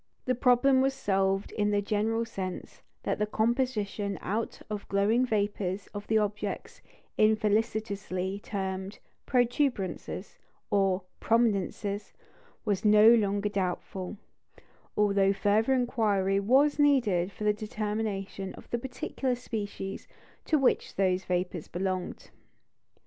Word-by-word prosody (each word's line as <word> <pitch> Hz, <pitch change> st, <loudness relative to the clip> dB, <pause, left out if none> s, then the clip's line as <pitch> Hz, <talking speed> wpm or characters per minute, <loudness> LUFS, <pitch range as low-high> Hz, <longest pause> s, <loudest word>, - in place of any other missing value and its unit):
The 255 Hz, -, +2 dB
problem 255 Hz, +2 st, +4 dB
was 270 Hz, 0 st, +1 dB
solved 195 Hz, -5 st, 0 dB
in 210 Hz, -1 st, 0 dB
this 205 Hz, 0 st, +1 dB
general 220 Hz, +2 st, 0 dB
sense, 190 Hz, -5 st, -6 dB, 0.2 s
that -, -, -1 dB
the 210 Hz, -, +1 dB
composition 215 Hz, -3 st, 0 dB
out 220 Hz, +4 st, -3 dB
of 210 Hz, -2 st, -6 dB
glowing 215 Hz, +6 st, +2 dB
vapours 205 Hz, -3 st, -1 dB
of 205 Hz, 0 st, -6 dB
the 220 Hz, -, +3 dB
objects 210 Hz, -1 st, -3 dB, 0.4 s
infelicitously 210 Hz, -3 st, +1 dB
termed 190 Hz, -1 st, -4 dB, 0.3 s
"protuberances" 245 Hz, -, -1 dB, 0.3 s
or 195 Hz, -2 st, +2 dB, 0.2 s
"prominences" 205 Hz, -2 st, 0 dB, 0.5 s
was 205 Hz, -3 st, 0 dB
no 215 Hz, +2 st, +7 dB
longer 205 Hz, -2 st, +2 dB
doubtful; 190 Hz, 0 st, -3 dB, 0.8 s
although 200 Hz, -1 st, +3 dB
further 210 Hz, +5 st, +2 dB
inquiry 210 Hz, -6 st, +1 dB
was 270 Hz, +9 st, +3 dB
needed 225 Hz, -11 st, +3 dB
for 205 Hz, -, -8 dB
the 210 Hz, 0 st, +3 dB
determination 210 Hz, -2 st, -3 dB
of -, -, -13 dB
the 240 Hz, -, 0 dB
particular 260 Hz, 0 st, -2 dB
species 205 Hz, -5 st, -5 dB, 0.4 s
to 310 Hz, -, +3 dB
which 270 Hz, -3 st, +1 dB
those 185 Hz, -1 st, +1 dB
vapours 180 Hz, -2 st, -2 dB
belonged. 185 Hz, 0 st, -3 dB
210 Hz, 115 wpm, -29 LUFS, 195-225 Hz, 0.8 s, no